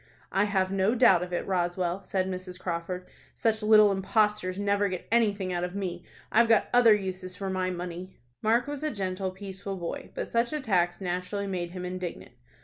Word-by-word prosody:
"I've 195 -2 +1
no 195 +4 +2
doubt 210 -8 +6
of 180 0 -5
it, 175 - -2
Roswell," 180 0 -1
said 185 0 -1
Mrs. 185 0 -6
Crawford. 180 0 -4 0.3
"Such 220 -1 +1
little 215 -1 +6
impostors 195 -1 +1
never 200 0 +1
get 185 -1 -5
anything 205 -5 +2
out 175 0 -1
of 180 +1 -4
me. 180 -3 -4 0.3
I've 230 +1 +4
got 225 -2 +4
other 235 -3 +7
uses 185 -2 -5
for 195 +1 -4
my 185 -1 0
money." 180 +1 -6 0.2
Mark 230 +3 +3
was 290 -1 -5
a 305 - 0
gentle, 190 -5 -2
peaceful 195 +1 -6
boy, 170 -2 -5
but - - -3
such 235 +4 0
attacks 190 - +1
naturally 180 +2 -2
made 180 -3 -3
him 180 0 -6
indignant. 180 -1 -6
190 Hz, 180 wpm, -28 LUFS, 180-210 Hz, 0.3 s, other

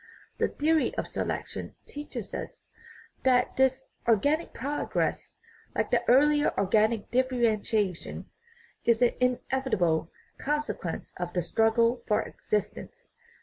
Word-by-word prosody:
The - - +3
theory 315 +1 +1
of - - -1
selection - - -4
teaches 295 +1 -7
us - - -6 0.6
that 255 -1 +3
this 265 0 +2 0.2
organic 285 +9 +2
progress, 285 +4 -2 0.4
like - - 0
the - - +3
earlier 295 +4 +5
organic 215 +2 +2
differentiation, 225 -7 0 0.6
is 235 +1 +3
an 245 - +4
inevitable 245 -10 +1 0.3
consequence 295 - -3
of 175 0 -4
the 180 - 0
struggle 230 +5 +2
for 215 0 +2
existence. 475 - -4
240 Hz, 105 wpm, -28 LUFS, 215-275 Hz, 0.6 s, earlier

